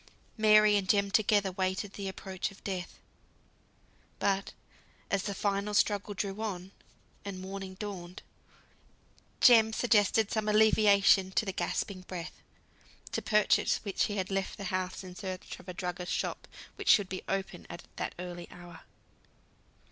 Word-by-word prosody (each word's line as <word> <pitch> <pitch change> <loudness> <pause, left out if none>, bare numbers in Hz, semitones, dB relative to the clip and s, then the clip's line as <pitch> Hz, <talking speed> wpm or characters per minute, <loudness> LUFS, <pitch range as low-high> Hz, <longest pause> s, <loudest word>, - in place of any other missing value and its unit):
Mary 215 -1 +6
and 190 -2 -3
Jem 200 -1 +3
together 205 -2 +3
waited 190 +2 -2
the 200 -1 -5
approach 190 0 -4
of 195 - -17
death; 185 -3 -5 1.2
but 195 0 0 0.6
as 200 - +2
the 200 0 -4
final 200 +1 -1
struggle 205 0 +1
drew 200 +2 -3
on, 190 -4 -4 0.5
and 200 -2 -6
morning 190 0 -7
dawned, 185 -3 -7 1.2
Jem 225 -3 +7
suggested 220 -2 +2
some 215 -1 0
alleviation 210 -3 +5
to 220 - +1
the 195 - -3
gasping 195 0 -2
breath, 180 -2 -8 0.7
to - - -2
purchase 210 -1 +3
which 200 -3 0
he 205 -1 -3
left 195 +1 -3
the 200 - -7
house 185 +1 -2
in 185 -1 -9
search 185 -2 -6
of 185 - -12
a - - -4
druggist's 180 0 -3
shop, - - -4 0.3
which - - -3
should 205 -4 +6
be 185 0 -5
open 195 -2 -3
at 170 - -8
that - - -3
early 175 -1 -7
hour. 175 -2 -12
195 Hz, 145 wpm, -30 LUFS, 185-210 Hz, 1.2 s, Jem